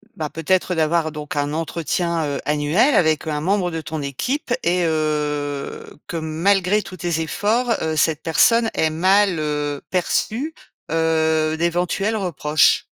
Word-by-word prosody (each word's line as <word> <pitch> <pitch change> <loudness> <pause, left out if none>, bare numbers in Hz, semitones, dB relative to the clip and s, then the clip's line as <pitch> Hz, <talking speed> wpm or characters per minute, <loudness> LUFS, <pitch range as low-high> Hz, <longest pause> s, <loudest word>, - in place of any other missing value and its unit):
bah, 155 -2 -3
peut-être 180 +3 0
d'avoir 160 0 +1
donc 150 -1 -7
un 145 0 -1
entretien, 165 +1 -1
heu, 140 - -2
annuel 150 - +2
avec, 155 -5 +2
heu, 155 - -2
un 150 - -2
membre 185 +1 0
de 165 0 -4
ton 155 0 -5
équipe 245 - -2
et, 180 -2 +2
heu, 150 -2 -2 0.2
que 170 - -4
malgré 185 +6 +1
tous 185 -1 -10
tes 165 -1 -1
efforts, 225 +8 0
heu, 160 0 -1
cette 155 0 +1
personne 225 +7 +3
ait 160 -1 +1
mal, 185 +2 +3
heu, 150 -1 -2
perçu, 225 - -1 0.4
heu, 160 -1 +1
d'éventuels 175 +5 0
reproches? 155 -7 +2
160 Hz, 150 wpm, -21 LUFS, 155-185 Hz, 0.4 s, personne